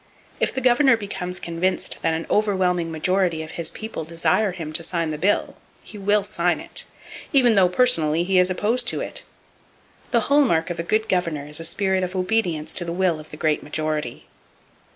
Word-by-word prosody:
If - - +1
the 265 - -3
governor 255 0 +4
becomes 185 -3 -4
convinced 170 +2 -1
that 165 -1 +1
an 165 - -4
overwhelming 185 -5 +1
majority 170 0 0
of 160 - -9
his 170 -2 -4
people 220 -7 -6
desire 170 +5 +1
him 160 -4 -7
to 170 - -1
sign 165 -2 -2
the 150 - -4
bill, 200 +5 0 0.3
he 210 - -10
will 205 +1 +2
sign 180 -3 0
it, - - -2 0.5
even 250 -5 +5
though 190 -3 +4
personally 170 -7 +3
he 185 +1 +2
is 180 0 +4
opposed 210 +7 0
to - - 0
it! - - -2 0.9
The 235 -3 +2
hall 285 +6 +3
mark 165 -7 +1
of 175 - -5
a 170 - -5
good 215 0 +1
governor 170 -6 -1
is 150 +1 -4
a 165 - -5
spirit 190 0 0
of 180 +1 -4
obedience 185 -5 -1
to - - +1
the 170 - -4
will 175 -2 0
of 155 - -12
the 150 - -10
great 155 -1 0
majority. 150 -4 -3
180 Hz, 195 wpm, -22 LUFS, 160-205 Hz, 0.9 s, even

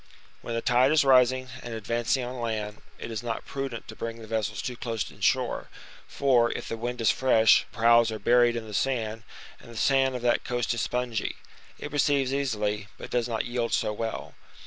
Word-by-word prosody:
When 115 - -4
the 115 - -2
tide 125 +3 +4
is 155 -2 +4
rising, 130 -1 +4
and 120 -1 -6
advancing 120 +3 -1
on 125 +1 -6
land, 110 -2 -3 0.2
it - - -7
is 110 - -3
not 115 -1 -4
prudent 135 -4 -5
to 110 - -9
bring 115 +1 -5
the 110 - -10
vessels 105 -2 -2
too 125 -1 -4
close 115 -3 -4
in - - -18
shore, - - +1 0.4
for, 125 -4 +2
if - - -6
the - - -3
wind 120 +1 -4
is 115 - +4
fresh, 115 -4 +4
the - - -16
prows 115 0 +5
are 110 - -4
buried 120 +3 +4
in 115 -1 -4
the 105 - -9
sand; 115 -2 -1 0.4
and - - -15
the 115 - -10
sand 135 +1 +2
of 125 - -5
that 120 -1 +2
coast 120 -1 -1
is 115 - -2
spongy; 120 -3 -2 0.4
it 145 - -7
receives 140 -2 +1
easily, 105 -7 -1
but - - -9
does 120 -1 0
not 115 -2 -1
yield 120 -1 -2
so 105 - +1
well. 110 +1 -5
120 Hz, 210 wpm, -27 LUFS, 115-125 Hz, 0.4 s, prows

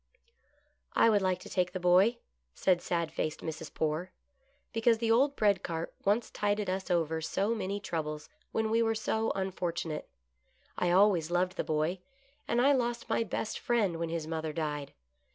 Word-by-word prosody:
" 290 0 -38 0.3
I 230 - +5
would 205 -2 +3
like 185 -1 +1
to - - -10
take 180 -1 0
the 185 - -3
boy," 185 +6 +4 0.4
said 180 -2 +2
sad 170 -2 -1
faced 155 -1 -3
Mrs. 160 -1 -6
Poore, 160 +3 -1 0.3
" 275 +2 -41
because 225 0 +3
the 225 0 0
old 275 +5 +4
bread 200 -6 +3
cart 165 -2 -4
once 210 +4 +2
tided 205 -1 0
us 190 0 -3
over 160 -2 +1
so 195 +7 0
many 200 -2 -2
troubles 150 -5 -4 0.2
when 220 0 0
we 230 +1 +3
were 225 -1 +2
so 220 0 0
unfortunate. 175 -4 -3 0.7
I 180 - 0
always 180 -3 +4
loved 180 +1 +1
the - - -1
boy, 155 +4 0 0.5
and 240 - +1
I 270 +3 +5
lost 240 -3 0
my - - +2
best 220 0 -3
friend 210 -8 +1
when 165 -1 -2
his 165 -1 -3
mother 160 -1 -3
died. 150 -3 -3
185 Hz, 180 wpm, -31 LUFS, 165-225 Hz, 0.7 s, I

